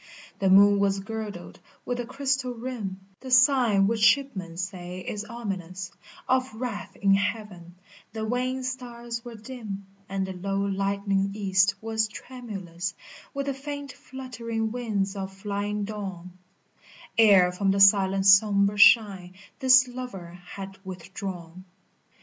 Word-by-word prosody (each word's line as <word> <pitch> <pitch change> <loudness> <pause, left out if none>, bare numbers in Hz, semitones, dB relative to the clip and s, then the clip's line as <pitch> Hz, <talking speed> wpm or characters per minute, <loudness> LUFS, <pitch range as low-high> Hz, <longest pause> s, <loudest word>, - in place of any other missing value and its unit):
] - - -21
The 195 - +2
moon 200 +1 +7
was 200 0 +1
girdled 210 -3 -7 0.3
with 245 0 -2
a 240 - -4
crystal 270 -1 -1
rim, 225 -6 -5 0.2
The 260 - -9
sign 250 -6 +5
which 220 +2 0
shipmen 210 -9 +2
say 185 -1 -5
is 210 +3 -5
ominous 190 -5 -6 0.4
Of 255 -3 +1
wrath 230 -3 -5
in 195 -1 +3
heaven, 200 -4 -2 0.4
the 220 0 -4
wan 255 +3 -1
stars 240 -2 -5
were 240 -2 -9
dim, 215 -4 -7 0.2
And 195 0 -1
the 190 - -6
low 195 +2 -3
lightening 200 0 0
east 195 -2 +2
was 220 -1 0
tremulous 195 -8 -7 0.4
With 275 0 -2
the 275 - -1
faint 285 0 -6
fluttering 230 -4 -5
wings 215 -5 -2
of 195 -1 -5
flying 205 +1 -3
dawn, 190 -4 -6 0.9
Ere 195 -5 +6
from 195 +2 -1
the 195 +1 +2
silent 195 -1 +5
sombre 200 +1 +5
shrine 195 -5 +5 0.2
this 260 -1 +6
lover 245 -9 -7 0.2
had 195 -1 -8
with 185 -1 -9
drawn. 185 -3 -7
205 Hz, 140 wpm, -26 LUFS, 195-240 Hz, 0.9 s, moon